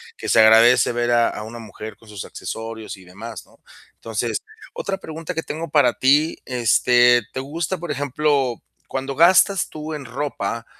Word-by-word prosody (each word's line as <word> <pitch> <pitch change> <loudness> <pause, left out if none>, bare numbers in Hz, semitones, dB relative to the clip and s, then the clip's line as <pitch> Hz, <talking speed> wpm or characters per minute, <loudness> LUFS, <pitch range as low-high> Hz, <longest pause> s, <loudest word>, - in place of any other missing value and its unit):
que - - -6
se - - +4
agradece 115 +3 +6
ver 120 0 -1
a 120 -1 +3
a - - -7
una 110 +2 -8
mujer 110 -1 -9
con 115 - -21
sus 105 -2 -7
accesorios 110 -1 -7
y 95 - -16
demás, 110 +5 -10
¿no? - - -24 0.4
Entonces, 115 +1 -3 0.3
otra 195 -1 -3
pregunta 160 -2 -7
que 160 - -2
tengo 160 +2 -5
para 140 -5 +3
ti, 145 +8 +2
este, 120 0 +3
¿te - - -3
gusta, 160 +7 -3
por 175 0 -7
ejemplo? 140 -2 0 0.3
Cuando 135 +1 -4
gastas 185 +4 +4
tú 155 +1 -7
en 145 -3 -6
ropa, 115 -4 -4
125 Hz, 170 wpm, -21 LUFS, 115-150 Hz, 0.4 s, agradece